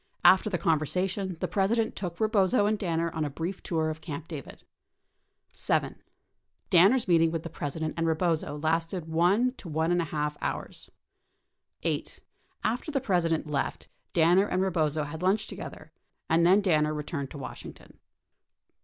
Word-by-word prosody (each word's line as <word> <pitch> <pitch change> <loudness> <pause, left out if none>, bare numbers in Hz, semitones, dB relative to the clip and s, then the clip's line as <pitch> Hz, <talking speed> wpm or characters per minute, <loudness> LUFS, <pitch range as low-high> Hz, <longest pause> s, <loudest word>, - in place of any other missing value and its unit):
After 190 +3 +6
the 185 - 0
conversation, 180 +3 0
the - - 0
President 220 +3 +1
took 175 -3 -5
Rebozo 215 0 +3
and 215 +1 +2
Dinner 170 -3 -1
on 160 -1 -2
a 150 - -1
brief 170 +6 -5
tour 160 -2 -1
of 155 0 -8
Camp 155 0 -6
David. 150 -6 -9 0.9
7. - - -1 0.7
Danner's 200 +8 +5
meeting 165 -2 +4
with 165 -1 -3
the 165 - -7
President 155 0 -3
and 165 0 0
Rebozo 160 -2 0
lasted 165 +3 -1
for 160 - -10
one 195 +10 +3
to 175 - -9
one 160 +2 0
and 175 0 +2
a - - -2
half 150 -1 -2
hours. - - -4 0.9
8. - - -2 0.4
After 240 +8 -1
the 285 -3 0
President 175 -10 +1
left, 150 -2 -3 0.2
Danner 175 +4 +4
and 185 -1 0
Rebozo 155 -5 0
had 150 +3 -7
lunch 190 +4 +2
to - - -6
gether - - -9 0.4
and 165 +1 +3
then 195 +3 +6
Danner 155 -5 +2
returned 145 -2 -4
to - - -9
Washington. 130 -2 -10
170 Hz, 165 wpm, -28 LUFS, 155-190 Hz, 0.9 s, After